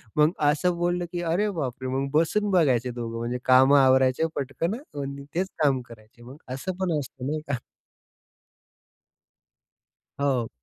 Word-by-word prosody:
मग 150 +2 +4 0.2
असं 175 +4 +1
बोललं 175 0 0
की 175 -1 -3
अरे 175 +5 +1
बापरे! 130 -7 -4
मग 135 +1 -1
बसून 200 +7 +2
बघायचे 130 -9 +2
दोघं 115 -1 -5
म्हणजे 120 +2 -2
काम 130 +2 +6
आवरायचे 130 +2 +4
पटकन 140 +7 -2
आणि 140 - -7
तेच 185 +2 +1 0.2
काम 135 -3 +3
करायचे 110 +1 -15
मग 130 +4 -11 0.2
असं 145 +8 -4
पण 175 -4 0
असतं 130 -1 -7
नाही 155 +1 -1
का. 140 -4 -1 2.6
हो. 130 -5 0
140 Hz, 140 wpm, -25 LUFS, 130-170 Hz, 2.6 s, काम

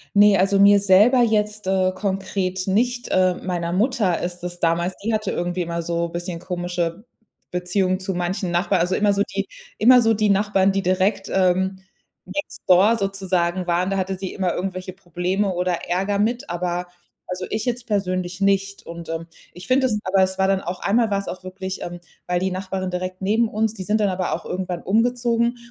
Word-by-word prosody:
Ne, 205 0 +6
also 195 +1 +3
mir 200 0 +7
selber 205 +6 +5
jetzt, 210 -2 0
äh, 190 -1 +2
konkret 190 -1 -2
nicht. 240 +5 0
Äh, 185 -1 +3
meiner 175 -2 -3
Mutter 210 -3 +1
ist 175 0 -5
es 175 0 -6
damals 170 +2 +1
die 225 +1 0
hatte 215 -2 -1
irgendwie 175 +1 -2
immer 170 0 -2
so 170 0 -1
bisschen 175 0 -5
komische 175 +1 -3 0.5
Beziehungen 185 +1 0
zu 190 0 -3
manchen 180 +1 -2
Nachbarn. 180 +1 +1
Also 180 +2 +1
immer 205 -1 +3
so 200 - 0
die - - -1 0.3
immer 250 +2 +7
so 225 0 +3
die 215 0 +1
Nachbarn, 195 -1 +3
die 195 0 0
direkt, 185 +3 0
ähm, 190 0 +1 0.5
next 295 - -5
door 195 +5 +6
sozusagen 190 -3 -1
waren, 175 +2 +1
da 195 - -1
hatte 190 0 -1
sie 190 -1 -5
immer 185 -3 -1
irgendwelche 185 0 -4
Probleme 185 +2 -2
oder 180 0 0 0.2
Ärger 195 +3 0
mit, 235 +3 0
aber 175 0 -2 0.4
also 180 0 -4
ich 215 +3 -2
jetzt 245 -1 -2
persönlich 185 -2 -2
nicht. 195 0 +1
Und, 170 -1 -8
ähm, 165 +1 -4 0.3
ich 180 +2 -11
finde 260 +1 +3
es 210 -3 -1
aber 190 0 +3
es 190 0 -1
war 190 - +3
dann 195 -1 +1
auch 180 0 -5
einmal 225 +2 +1
war's 200 0 -1
auch 185 0 -6
wirklich, 190 0 -6
ähm 175 0 -6 0.3
weil 180 0 +1
die 190 0 -1
Nachbarin 190 0 -3
direkt 185 +1 -4
neben 220 +4 +2
uns, 220 0 -1
die 190 -4 -6
sind 215 +3 +1
dann 205 -2 +2
aber 185 -1 -1
auch - - -4
irgendwann 180 -2 -4
umgezogen. 235 +2 +1
190 Hz, 195 wpm, -22 LUFS, 180-205 Hz, 0.5 s, mir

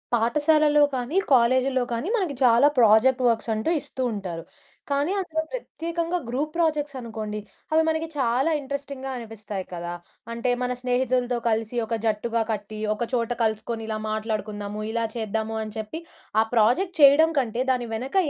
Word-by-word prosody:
పాఠశాలలో 295 +5 +3
కానీ 255 +7 -2 0.2
కాలేజీల్లో 255 +2 +3
కానీ 250 - -2
మనకి 355 -9 -1
చాలా 240 +3 +6
ప్రాజెక్ట్ 245 +4 +5
వర్క్స్ 230 0 +1
అంటూ 220 +8 -1
ఇస్తూ 260 - -6
ఉంటారు. 180 -5 -5 0.5
కానీ 285 +5 +1
అందులో 320 -4 -2
ప్రత్యేకంగా 335 -7 -3
గ్రూప్ 275 +6 -2
ప్రాజెక్ట్స్ 300 -4 0
అనుకోండి, 220 -3 -5 0.3
అవి 320 - +5
మనకి 320 0 0
చాలా 260 +4 +2
ఇంట్రెస్టింగ్‍గా 280 -1 -5
అనిపిస్తాయి 215 -4 -6
కదా! 175 0 -4 0.4
అంటే 235 +2 -1
మన 250 0 0
స్నేహితులతో 250 0 +1
కలిసి 225 +1 -1
ఒక 230 +1 -2
జట్టుగా 225 +2 0
కట్టి 215 0 -5
ఒక 225 +3 -2
చోట 235 -1 0
కలుసుకొని 225 +1 -2
ఇలా 220 -1 -2
మాట్లాడుకుందాము, 215 -1 -3
ఇలా 230 0 -1
చేద్దాము 220 0 -2
అని 215 -1 -8
చెప్పి 220 +9 -5 0.4
ఆ - - +4
ప్రాజెక్ట్ 245 - +3
చేయడం 285 +3 +8
కంటే 245 -1 -1
దాని 245 -2 -1
వెనక 255 - -5
240 Hz, 150 wpm, -25 LUFS, 220-280 Hz, 0.5 s, చేయడం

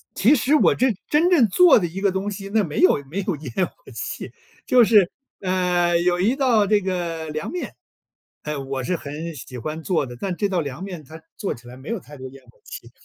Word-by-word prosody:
其 255 +9 +5
实 270 +5 +2
我 300 - +4
这 260 - +2 0.2
真 315 +4 +3
正 270 -10 +5
做 345 - +6
的 175 - -1
一 180 +4 -6
个 200 -1 +2
东 190 +2 -2
西， 195 -1 -7
那 215 -2 +3
没 155 -3 -4
有 145 -6 +4
没 195 +7 -2
有 190 -4 -2
烟 150 +5 -2
火 - - -22 0.2
气， - - -6 0.4
就 250 -1 +6
是， 210 -5 +5 0.3
呃， 180 -2 +1
有 175 +1 +1
一 220 +8 +2
道 235 -7 +3
这 210 0 +4
个 170 -4 -3
凉 155 0 -4
面， 360 - -5 0.7
嗯， 145 -3 -4
我 135 -1 -2
是 180 - -1
很 155 +1 -6
喜 125 -1 -9
欢 155 +7 -5
做 165 -5 0
的， 120 -1 -9
但 190 -3 -3
这 205 - +1
道 180 -3 0
凉 145 +3 -6
面 180 -6 -7
它 160 +3 -12 0.2
做 200 - -3
起 120 +1 -16
来 125 - -10
没 130 +3 -11
有 230 -3 -2
太 145 -3 -14
多 130 - -8
烟 135 0 -15
火 120 - -23
气， 115 - -10
180 Hz, 250 characters per minute, -22 LUFS, 150-205 Hz, 0.7 s, 做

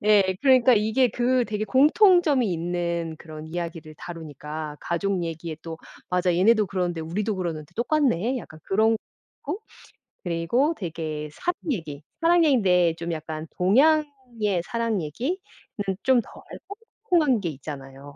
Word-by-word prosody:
네 200 -3 +4
그러니까 255 -2 +6
이게 220 +4 +2
그 245 +2 +1
되게 215 -1 -3
공통점이 300 - +4
있는 170 -1 -2
그런 155 -1 -9
이야기를 165 -2 -6
다루니까 155 -2 -7
가족 180 +1 -1
얘기에 165 -1 -5
또 165 -1 -6 0.3
'맞아 180 0 +1
얘네도 215 +3 +4
그러는데 180 -3 -2
우리도 200 +7 -2
그러는데 165 -3 -4
똑같네.' 255 - +1
약간 155 -8 -11
그렇고 220 +3 +2 1.3
그리고 180 - +1
되게 155 -4 -4
사랑 355 - -1 0.2
얘기, 155 -7 -6 0.2
사랑 335 0 +5
얘긴데 180 - +3
좀 170 0 -4
약간 155 0 -5
동양의 250 - +2
사랑 230 -5 -1
얘기는 235 - -2 0.7
좀 260 -2 +4
덜 - - -14 0.7
꼼꼼한 300 - +3
게 175 - -2
있잖아요. 140 -1 -9
185 Hz, 300 characters per minute, -25 LUFS, 165-245 Hz, 1.3 s, 그러니까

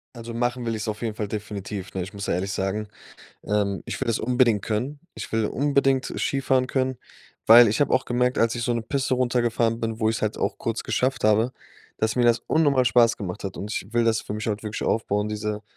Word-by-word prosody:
Also, 115 0 -7
machen 120 +1 -1
will 115 - -1
ich's 110 0 -4
auf 105 -1 -3
jeden 115 -2 -3
Fall 105 -1 -3
definitiv, 100 -2 -6
ne? 95 - -2
Ich 95 +3 -7
muss 100 0 -6
ja - - 0
ehrlich 95 +2 -2
sagen, 100 +2 -2 0.6
ähm, 100 -2 0
ich - - -5
will - - -2
das 115 - +1
unbedingt 120 -3 +2
können. 125 +7 -2 0.2
Ich - - -7
will 110 -1 +1
unbedingt 135 0 +1
Skifahren 135 -2 +1
können, 130 -1 -1 0.5
weil 115 0 +9
ich 110 - -1
hab 145 - +3
auch 130 - +2
gemerkt, 125 +1 0
als 115 +1 +2
ich 120 - -3
so 120 - +1
'ne 115 - -2
Piste 135 +2 -1
runtergefahren 120 -2 +1
bin, 115 0 -3
wo 110 - +3
ich's 110 - -1
halt 110 0 -1
auch - - -2
kurz 115 0 -2
geschafft 130 +1 -1
habe, 110 +3 +3 0.5
dass 110 +1 0
mir 125 - +3
das 120 0 +4
unnormal 145 -5 +3
Spaß 120 0 +4
gemacht 100 -1 -6
hat. 95 - -5
Und 105 +2 -5
ich 100 - -5
will 120 0 +3
das 115 -1 +2
für - - -7
mich 105 +1 -3
halt 105 +1 -3
wirklich 105 0 -4
aufbauen, 105 -1 0
diese 105 0 -3
115 Hz, 230 wpm, -24 LUFS, 105-125 Hz, 0.6 s, weil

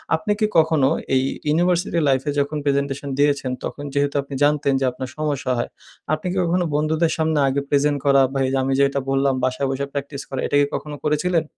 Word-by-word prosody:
আপনি 210 +6 -2
কি 215 - +3
কখনো 155 -4 +4 0.3
এই 130 - +3 0.3
ইউনিভার্সিটি 175 +2 +1
লাইফে 135 +2 +1
যখন 145 +2 -1
প্রেজেন্টেশন 140 0 -1
দিয়েছেন 145 -3 +2
তখন 145 - -5
যেহেতু 145 0 0
আপনি 140 0 -10
জানতেন 145 -1 +2
যে 135 - 0
আপনার 130 +1 -6
সমস্যা 145 -4 -1
হয়, - - -2 0.4
আপনি 155 +3 -2
কি 190 - -3
কখনো 175 +1 +1
বন্ধুদের 160 +2 +1
সামনে 160 -1 +1
আগে 140 +1 0
প্রেজেন্ট 145 0 +2
করা 140 -1 +5
বা 135 - -1
এই - - -2
আমি 135 +1 0
যে - - +5
এটা 140 0 -2
বললাম 135 0 +2
বাসায় 130 +2 0
বইসা 140 +1 -2
প্র্যাকটিস 140 0 -5
করা 135 - -2
এইটা 145 - +1
কি 140 - +2 0.2
কখনো 150 -1 -7
করেছিলেন? 160 +3 +1
145 Hz, 200 wpm, -21 LUFS, 140-155 Hz, 0.4 s, করা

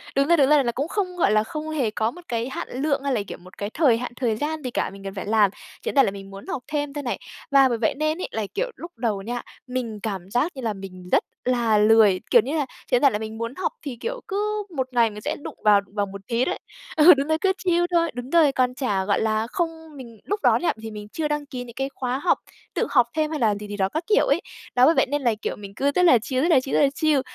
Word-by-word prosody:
đúng 275 +1 +3
rồi, 340 +1 +5
đúng 275 -3 +4
rồi 300 -2 +5
là 240 - 0
cũng 275 +5 -2
không, 365 -1 -2
gọi 335 - +3
là, 215 0 +4
không 305 +7 -6
hề 275 -8 0
có 220 +1 0
một 355 - -12
cái 235 +1 -2
hạn - - -5
lượng 275 +1 -1
hay 280 -1 0
là, 225 - +1
kiểu, - - -7
một 180 +1 -16
cái 205 - -3
thời 255 -2 +3
hạn, 250 +1 -5
thời 240 -4 0
gian 300 +5 -3
gì 250 - -3
cả - - -1
mình 195 0 -12
cần 195 -1 -5
phải 195 - -5
làm, 210 -2 +3 0.3
chỉ - - -1
đơn - - -14
giản 275 -3 +6
là 195 - 0
mình 195 0 -9
muốn 195 +1 -10
học 250 - -4
thêm 290 -2 -2
thôi 290 0 -4
này. 245 - -2 0.3
Và 275 -1 +6
bởi 235 - 0
vậy 220 -1 +1
nên 310 +1 0
ấy - - -2
là, 220 -1 -2
kiểu, - - -2
lúc 340 +1 -9
đầu 220 -4 -1
nha, 240 +4 -4 0.3
mình 245 -4 -4
cảm 195 -4 -4
giác 265 +9 +1
như 265 - -6
là 225 -3 -1
mình 185 -2 -10
rất - - +4 0.2
là 240 -3 +2
lười, 210 -2 +5
kiểu - - +7
như 275 +8 -2
là, 290 - +1 0.2
chỉ - - +2
đơn 245 - +2
giản 280 - +5
là 210 - -1
mình 220 0 -6
muốn 230 +3 -4
học 375 - -2
thì, 270 -5 -6
kiểu, - - -4
cứ 420 0 -1
1 260 -2 -1
ngày 235 -2 +4
mình 210 0 -9
sẽ - - -2
đụng - - -7
vào 210 -1 +6
vào 205 -1 +1
một 200 0 -9
tí 240 +1 +1
đấy. - - -2 0.4
Ừ, 320 +4 +9
đúng 275 0 -1
rồi 315 0 +2
cứ 385 -1 +3
chill 350 -2 +2
thôi, 335 -2 +2
đúng 245 +1 -6
rồi, 315 -2 +5
còn 250 -1 +1
chả, 205 -8 -1
gọi 200 - +1
là 220 0 0
không 345 -3 0 0.3
mình 235 -4 -11
lúc 410 +1 -1
đó - - +5
nha, 350 - 0
thì 220 0 -6
mình 210 -1 -8
chưa 310 +6 -2
đăng 295 -1 -2
ký 255 -3 -6
những 235 -1 -12
cái 270 0 -2
khóa 255 0 -2
học, 350 - +2 0.4
tự - - 0
học 245 -4 +4
thêm 310 -1 0
hay 310 - -2
là 215 -3 +3
gì 205 +1 -7
gì 205 0 -6
đó 190 -1 +1
các 315 - -3
kiểu 430 +2 +4
ấy. - - +2 0.3
Đó 250 0 +6
bởi 320 +4 +5
vậy - - +4
nên 290 +1 0
là, 240 -4 +2
kiểu, - - -2
mình 200 -1 -10
cứ 280 +4 +1
rất 360 - +4
là 330 -8 +7
chill, 255 +4 -2
rất 340 - +2
là 310 -6 +6
chill, 265 - -3
rất - - +5
là 280 - +5
chill, 305 -3 +2
255 Hz, 300 wpm, -24 LUFS, 220-300 Hz, 0.4 s, Ừ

